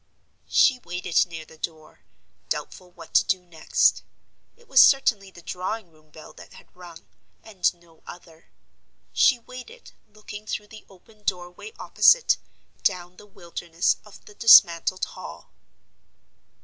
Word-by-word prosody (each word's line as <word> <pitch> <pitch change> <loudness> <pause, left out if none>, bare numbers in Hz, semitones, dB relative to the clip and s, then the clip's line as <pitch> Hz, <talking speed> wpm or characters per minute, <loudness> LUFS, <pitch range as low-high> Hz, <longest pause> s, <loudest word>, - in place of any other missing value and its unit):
She 260 -4 +4
waited 180 -4 -1
near 160 -2 -9
the 160 - -18
door, 155 -2 -8 0.5
doubtful 180 - -5
what 170 -2 -15
to - - +5
do 185 -2 -2
next; 165 -3 +1 0.6
it 475 0 -24
was 265 - +6
certainly 220 -8 +3
the 175 -2 -16
drawing 185 +2 -5
room 155 -1 -26
bell 155 +1 -14
that - - -15
had - - -18
rung, 175 -2 -14 0.4
and 195 -5 0
no 170 -2 -25
other. 165 -2 -14 0.6
She 260 - +4
waited, 255 - -13 0.2
looking 210 0 -11
through 210 -1 -5
the 215 -1 -14
open 210 +3 -21
doorway 180 - -5
opposite, - - +4 0.4
down 180 -2 -2
the 210 - -15
wilderness 170 -2 -2
of 210 - -17
the 210 - -15
dismantled 185 -5 +5
Hall. - - -12
180 Hz, 135 wpm, -24 LUFS, 170-215 Hz, 0.6 s, was